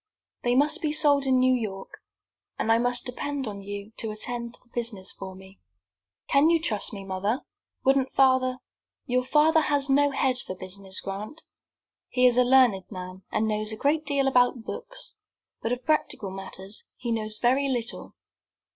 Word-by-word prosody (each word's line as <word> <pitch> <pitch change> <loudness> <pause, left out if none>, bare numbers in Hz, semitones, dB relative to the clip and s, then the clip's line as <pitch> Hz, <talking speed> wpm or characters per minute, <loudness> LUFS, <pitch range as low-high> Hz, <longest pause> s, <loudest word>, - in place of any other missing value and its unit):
"They 245 0 +1
must 300 +6 +3
be 305 -3 0
sold 285 -3 +4
in 260 -1 +4
New 255 0 +4
York, 205 -6 -4 0.6
and 225 - 0
I 225 - +5
must 245 0 +2
depend 275 +2 -3
upon 205 -3 -6
you 200 +1 -7
to 225 - -2
attend 235 +2 -2
to - - -10
the 250 - -29
business 230 -6 -1
for 190 -1 -8
me." 190 +1 -15 0.7
"Can 280 +3 +4
you 335 -1 +4
trust 220 -11 0
me, 200 -2 -7
mother? 195 +6 -2 0.4
Wouldn't 270 0 +3
father 260 -1 +3 0.3
" - - -67
"Your 255 +1 +1
father 310 +4 +4
has 285 -2 +1
no 285 +1 +4
head 265 -2 +1
for 185 - -6
business, 190 +1 -8
Grant. 210 +11 -6 0.7
He 250 0 +2
is 245 -1 +6
a 250 - +6
learned 245 -7 +4
man, 185 -1 -8
and 220 - +1
knows 215 0 -1
a 220 - -5
great 300 +5 +1
deal 280 -2 +1
about 245 -2 +3
books, - - -5 0.4
but 225 - -2
of 250 +1 -3
practical 300 -10 0
matters 195 +1 -8
he 240 -1 -4
knows 215 -1 -1
very 265 +4 +2
little. 240 -3 -3
245 Hz, 180 wpm, -26 LUFS, 210-275 Hz, 0.7 s, is